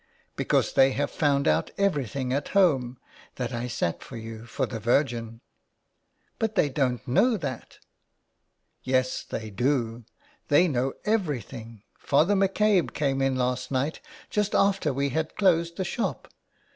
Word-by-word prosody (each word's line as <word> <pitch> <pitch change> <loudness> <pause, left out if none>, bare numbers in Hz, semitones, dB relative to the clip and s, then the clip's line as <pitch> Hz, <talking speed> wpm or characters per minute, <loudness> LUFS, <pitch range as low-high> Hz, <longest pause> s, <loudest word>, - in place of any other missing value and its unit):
" - - -38
Because - - +1
they 135 0 +5
have 145 +1 -1
found 140 -2 +1
out - - +2
everything 140 - 0
at 140 +1 -1
home, 130 -10 +3 0.4
that 125 -1 -3
I 120 +1 -3
sat 85 -8 -2
for 120 - -9
you, 115 0 -8
for - - -1
the 115 - -6
Virgin." 115 -1 0 1.0
"But 220 -1 -1
they 145 - +3
don't 130 -3 -1
know 225 - +3
that—" 135 - -6 1.0
"Yes, 130 0 0
they 110 -1 -6
do. 120 0 -1 0.4
They 160 +5 +5
know 130 -3 0
everything. 130 - -3 0.2
Father 155 +8 +3
McCabe 195 -1 +2
came 135 -2 0
in 135 -1 +1
last 125 0 -1
night, 140 - -1 0.3
just 210 -1 0
after 195 -6 +2
we 140 +1 -1
had 155 +3 -2
closed 170 -4 +2
the 190 - -1
shop. 190 - -3
135 Hz, 145 wpm, -26 LUFS, 125-165 Hz, 1.0 s, they